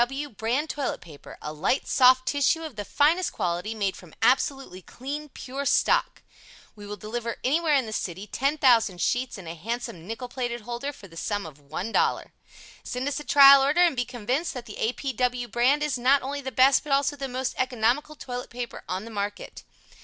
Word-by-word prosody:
P. - - +8 0.2
W. - - -11
Brand 235 +7 -1
Toilet 280 -3 -3
Paper. 155 -4 -13
A 150 - -5
light, 155 - 0
soft 255 0 +5
tissue 285 +3 +1
of 310 -6 -7
the 205 - -4
finest 320 - +2
quality, 180 +5 -2
made 200 -3 -1
from 175 -4 -14
absolutely 265 -6 +1
clean, 290 - -7
pure 270 +1 -6
stock. - - +2 0.5
We 205 -1 -11
will 210 - -5
deliver 230 +2 -4
anywhere 305 +3 +2
in 265 -3 +2
the 220 - -6
city 185 -1 -4
10,000 245 -6 +2
sheets 245 +6 -1
and 185 -4 -10
a 165 - -5
handsome 185 -2 -5
nickel 230 +3 -5
plated 240 -1 -4
holder 240 +5 -4
for 205 -8 -14
the 165 -2 -15
sum 205 +2 -2
of 150 -2 -11
$1.00 155 +10 -1 0.5
Send 250 +2 -4
us 285 - -2
a - - -7
trial 275 -1 +8
order 290 +6 +3
and 345 -5 +4
be 245 - 0
convinced 250 +6 -3
that 245 -2 -6
the 210 - -10
A. 225 - +1
P. 270 0 -4
W. 250 -1 -1
Brand 250 +6 +2
is 290 -4 -1
not 265 +3 +4
only 280 +2 -4
the 265 -1 -5
best 260 +3 +5
but 295 - -7
also 275 +1 +2
the 275 -1 -4
most 255 0 -3
economical 255 +4 0
toilet 250 -3 -6
paper 240 -1 -6
on 185 +4 -3
the 230 - -9
market. 205 -1 -5
250 Hz, 205 wpm, -26 LUFS, 215-275 Hz, 0.5 s, P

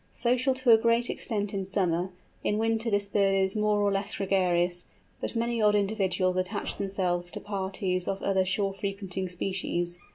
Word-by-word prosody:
Social 250 +2 +1
to 260 -2 +3
a 225 - +8
great 235 +1 +2
extent 205 -3 -3
in 195 -1 -1
summer, 185 -2 0 0.3
in 210 - +1
winter 225 +1 +1
this 205 -1 +1
bird 195 -1 +2
is 190 +1 +1
more 210 -1 +2
or 200 - +2
less 200 +1 -2
gregarious; 180 -2 +1 0.3
but - - -4
many 235 0 0
odd 210 -1 +4
individuals 195 -3 +1
attach 185 +3 -2
themselves 180 -3 -1
to - - -5
parties 190 -2 -2
of 195 - -1
other 190 -1 +2
shore 195 +1 0
frequenting 195 -2 -3
species. 175 -1 -2
195 Hz, 170 wpm, -28 LUFS, 185-210 Hz, 0.3 s, a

